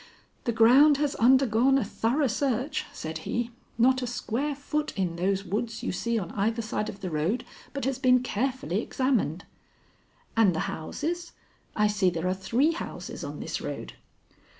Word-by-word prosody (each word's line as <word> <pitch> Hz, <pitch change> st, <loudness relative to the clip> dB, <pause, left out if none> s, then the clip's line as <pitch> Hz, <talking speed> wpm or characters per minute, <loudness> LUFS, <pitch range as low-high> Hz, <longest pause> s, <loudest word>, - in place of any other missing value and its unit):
"The 235 Hz, -, +2 dB
ground 260 Hz, +6 st, +6 dB
has 290 Hz, -1 st, 0 dB
undergone 260 Hz, +1 st, +4 dB
a 270 Hz, -, +1 dB
thorough 235 Hz, +7 st, 0 dB
search," 265 Hz, +3 st, 0 dB
said 160 Hz, 0 st, -5 dB
he. 235 Hz, +8 st, -2 dB, 0.3 s
"Not 260 Hz, +2 st, +4 dB
a 250 Hz, -, -2 dB
square 245 Hz, +4 st, -2 dB
foot 300 Hz, +2 st, -2 dB
in 180 Hz, -3 st, 0 dB
those 195 Hz, +3 st, 0 dB
woods 220 Hz, +5 st, -3 dB
you -, -, -1 dB
see 230 Hz, +5 st, -1 dB
on 180 Hz, -6 st, -3 dB
either 225 Hz, +3 st, 0 dB
side 215 Hz, 0 st, -2 dB
of 200 Hz, -, -9 dB
the 185 Hz, -3 st, -4 dB
road, 165 Hz, +11 st, 0 dB, 0.3 s
but 275 Hz, -2 st, -4 dB
has 265 Hz, -1 st, -1 dB
been 255 Hz, -2 st, +4 dB
carefully 250 Hz, -4 st, -1 dB
examined." 235 Hz, -, 0 dB, 0.9 s
"And 210 Hz, -6 st, +4 dB
the -, -, 0 dB
houses? 335 Hz, -, -4 dB, 0.4 s
I 210 Hz, -, +3 dB
see 205 Hz, -3 st, +3 dB
there 170 Hz, 0 st, -2 dB
are 185 Hz, -, +2 dB
three 230 Hz, -, +1 dB
houses 335 Hz, -, -6 dB
on -, -, -6 dB
this -, -, -4 dB
road." -, -, -5 dB
235 Hz, 170 wpm, -27 LUFS, 195-265 Hz, 0.9 s, ground